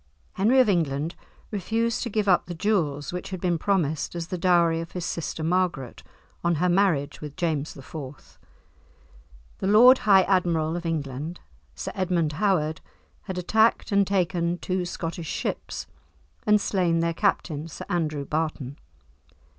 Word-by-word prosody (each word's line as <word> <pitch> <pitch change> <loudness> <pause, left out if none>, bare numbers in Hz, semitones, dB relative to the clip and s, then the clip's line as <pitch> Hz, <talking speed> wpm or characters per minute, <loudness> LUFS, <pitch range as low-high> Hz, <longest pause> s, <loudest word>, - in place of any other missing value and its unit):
Henry 225 +7 +3
of 255 - +5
England 160 -4 0 0.4
refused 225 +3 -1
to 240 - -2
give 210 -1 -1
up 180 -2 +3
the 175 - -5
jewels 160 -7 0
which 180 - -5
had 185 -2 -5
been 175 -2 0
promised 160 -5 0
as 170 -1 -4
the 185 - -3
dowry 170 -2 +3
of 165 - -9
his 180 -2 -4
sister 165 -1 -4
Margaret 170 -7 -1 0.4
on 170 0 +2
her 180 +4 +1
marriage 175 -6 +1
with 150 -2 -7
James 155 -4 -2
IV. 135 0 -10 1.2
The 190 - -1
Lord 245 +6 +7
High 195 -2 +5
Admiral 170 -4 +1
of 175 -1 -4
England, 150 +1 -4 0.4
Sir - - -5
Edmund 180 -5 0
Howard, 160 -7 +1 0.4
had 190 -2 -5
attacked 220 +6 +2
and 200 -1 +3
taken 175 -3 0
two 185 0 -2
Scottish 165 -1 -5
ships, - - -4 0.6
and 210 0 +5
slain 175 -5 +1
their 170 0 0
captain, 165 -5 -1
Sir 160 - -8
Andrew 155 -4 -1
Barton. 150 -3 -3
175 Hz, 150 wpm, -25 LUFS, 155-190 Hz, 1.2 s, Lord